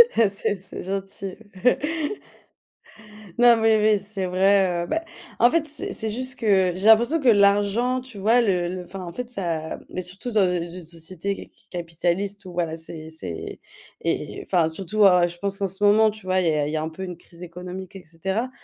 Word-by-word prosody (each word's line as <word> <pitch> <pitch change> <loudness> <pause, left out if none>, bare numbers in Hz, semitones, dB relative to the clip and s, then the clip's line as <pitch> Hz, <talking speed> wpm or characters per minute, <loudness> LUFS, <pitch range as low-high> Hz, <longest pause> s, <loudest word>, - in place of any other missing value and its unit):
Ah 225 -3 +4
c'est 200 0 -2
c'est - - -7
gentil. 195 0 -4 2.0
Non, 240 -1 +7
mais 225 -1 +4 0.2
oui, 205 - -1
c'est 200 -2 -3
vrai, 185 -1 +3
heu - - -11
bah, 325 - -1 0.4
en 240 +1 +6
fait, 330 -2 +1
c'est 300 - -3
c'est 220 - -1
juste 255 +4 -3
que 195 -5 +3
j'ai 195 +4 0
l'impression 235 +9 +6
que 265 - 0
l'argent, 205 +4 +3
tu 255 -4 -12
vois, 225 +5 +4
le 185 -6 +1
le, 180 0 -5
enfin, 185 +2 -8
en 170 - -6
fait, 250 +3 -6
ça 170 -8 -3
mais 185 - -4
surtout 185 +7 -4
dans, 215 -2 +3
heu, 180 -2 +1
z 175 +2 -8
une 170 - -11
société 170 +4 -4
c - - -11
c - - -27
capitaliste, 180 +4 -2
où 180 - -9
voilà, 170 -2 -1
c'est 160 -1 -9
c'est 90 - -7 0.4
et - - -2
et - - -9
enfin, 175 -4 +2
surtout, 195 +5 +1
à 180 -2 +6
je 175 0 -8
pense 200 +1 -2
qu'en 200 - 0
ce 190 +2 -6
moment, 215 +2 +6
tu 215 -2 -13
vois, 185 0 +2
il 175 - +1
y 160 - +3
a 145 -1 0
il - - -3
y 160 - -1
a - - -1
un 160 - -3
peu 165 +4 -8
une 180 -2 -6
crise 175 0 -15
économique, 180 +2 -8
et 190 - -9
cetera. 190 +9 -3
190 Hz, 220 wpm, -24 LUFS, 175-215 Hz, 2.0 s, Non